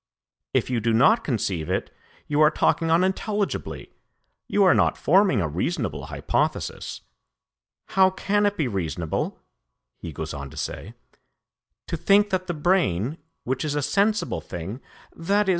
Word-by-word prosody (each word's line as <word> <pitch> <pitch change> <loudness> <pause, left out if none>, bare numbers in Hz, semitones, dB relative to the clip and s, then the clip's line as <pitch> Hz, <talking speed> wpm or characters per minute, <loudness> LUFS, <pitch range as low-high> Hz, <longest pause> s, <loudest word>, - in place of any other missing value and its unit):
If - - 0
you 120 - +1
do 115 +1 +1
not 140 - +5
conceive 95 - -2
it, - - -2 0.3
you 150 +1 +1
are 150 - +7
talking 165 +1 +1
unintelligibly, 190 +4 -1 0.6
you 205 - +3
are 185 - +6
not - - +2
forming 185 - +3
a 85 - 0
reasonable 90 - -2
hypothesis.' - - -2 0.9
'How 190 -1 +5
can 205 +2 +1
it 205 - -2
be 150 - +1
reasonable,' 85 -6 -3 0.6
he 85 - -7
goes 80 +2 -5
on 70 -1 -6
to - - -13
say, - - -5 0.9
'to - - -3
think 205 +1 +4
that 185 -1 -1
the 175 - -2
brain, 150 - +1 0.2
which 130 +1 -2
is 150 -2 -2
a 145 - 0
sensible 205 +7 +1
thing, 95 +9 -7 0.3
_i.e. 200 +4 +1
155 Hz, 145 wpm, -24 LUFS, -, 0.9 s, are